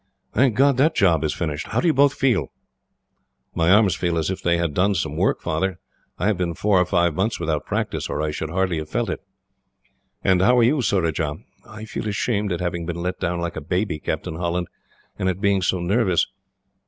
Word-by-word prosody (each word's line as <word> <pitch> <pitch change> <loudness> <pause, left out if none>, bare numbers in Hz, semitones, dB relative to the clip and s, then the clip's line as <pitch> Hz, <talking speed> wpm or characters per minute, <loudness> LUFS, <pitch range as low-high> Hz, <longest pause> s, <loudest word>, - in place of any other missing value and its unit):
"Thank 130 -4 +3
God 140 +1 +4
that 155 +4 +3
job 85 -5 +3
is 75 - 0
finished! 75 -3 -3
How - - -1
do - - -1
you 165 - +4
both 140 0 +4
feel?" 120 - +1 1.0
"My 85 0 +1
arms 100 -1 +5
feel 85 0 -1
as 80 +3 0
if 95 - -5
they 85 0 +2
had 85 -3 -1
done 95 +5 +2
some 80 - -2
work, - - +1
Father. 85 +3 -1 0.4
I - - -2
have 105 -3 +1
been 85 -2 -1
four 100 -1 +3
or - - +2
five 85 -3 +2
months 100 +7 -1
without 75 -1 -2
practice, - - -2
or - - -2
I 75 0 -1
should 75 +1 -4
hardly 90 -1 0
have 75 0 -7
felt - - -1
it." - - -4 1.0
"And 95 -1 +3
how 125 +6 +4
are 120 - +5
you, 135 +5 +3
Surajah?" 85 -8 0 0.3
"I 110 +1 -8
feel 110 - -5
ashamed 105 -1 -1
at 90 - -2
having 85 -1 -3
been 85 0 -4
let 90 +1 -3
down 85 0 -1
like 85 0 -3
a 80 - -4
baby, 90 +1 -1
Captain 80 +1 -4
Holland, 85 0 -2 0.5
and 95 - +1
at 95 0 -2
being 100 -1 +2
so 95 +1 +1
nervous." 95 0 +2
90 Hz, 215 wpm, -22 LUFS, 85-105 Hz, 1.0 s, arms